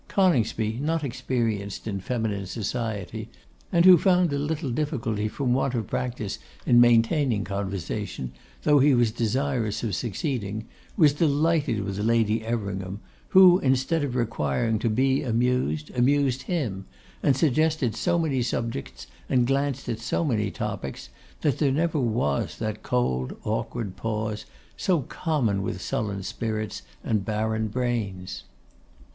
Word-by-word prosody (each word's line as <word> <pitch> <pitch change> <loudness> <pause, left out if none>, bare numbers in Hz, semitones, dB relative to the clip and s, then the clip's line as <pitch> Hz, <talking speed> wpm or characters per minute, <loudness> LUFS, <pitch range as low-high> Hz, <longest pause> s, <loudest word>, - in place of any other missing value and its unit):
Coningsby, 115 - +1
not 160 +1 0
experienced 115 -6 -2
in 100 -2 -2
feminine 105 -2 -2
society, 110 -3 -4 0.4
and 170 +1 +4
who 185 -3 +9
found 180 -4 +3
a 140 - 0
little 150 -1 -2
difficulty 120 -7 -1
from 125 +3 -1
want 130 0 0
of 115 -3 -1
practice 125 -3 -3 0.3
in 120 0 +6
maintaining 120 0 +3
conversation, 95 -10 -4 0.3
though 150 -1 +5
he 140 0 +5
was 120 -2 +3
desirous 120 -1 -1
of 110 -4 -1
succeeding, 110 - -3 0.3
was 155 -6 +6
delighted 150 - +1
with 100 0 -4
Lady 110 0 +2
Everingham, 100 -4 -3 0.3
who, 185 -1 +7
instead 135 +4 +1
of 130 -3 -2
requiring 110 - 0
to 115 - 0
be 130 +4 +2
amused, 120 - 0
amused 135 +1 +2
him; 115 - -2 0.4
and 135 -2 +3
suggested 155 -4 +2
so 170 +9 +1
many 150 -6 +1
subjects, 115 - -3 0.2
and 125 -3 +3
glanced 135 +1 0
at 110 - -2
so 120 +8 -1
many 105 -7 0
topics, 65 -7 -5 0.3
that 145 -4 +1
there 140 -3 +3
never 160 +2 +1
was 110 - 0
that 110 -1 -3
cold, 65 - -1
awkward 100 -6 -3
pause, 110 -1 -3 0.3
so 175 -5 +1
common 125 - -1
with 95 - -3
sullen 100 -2 -2
spirits 110 +1 -3 0.2
and 105 -3 0
barren 110 +1 -1
brains. 100 -7 -3
120 Hz, 135 wpm, -26 LUFS, 105-140 Hz, 0.4 s, who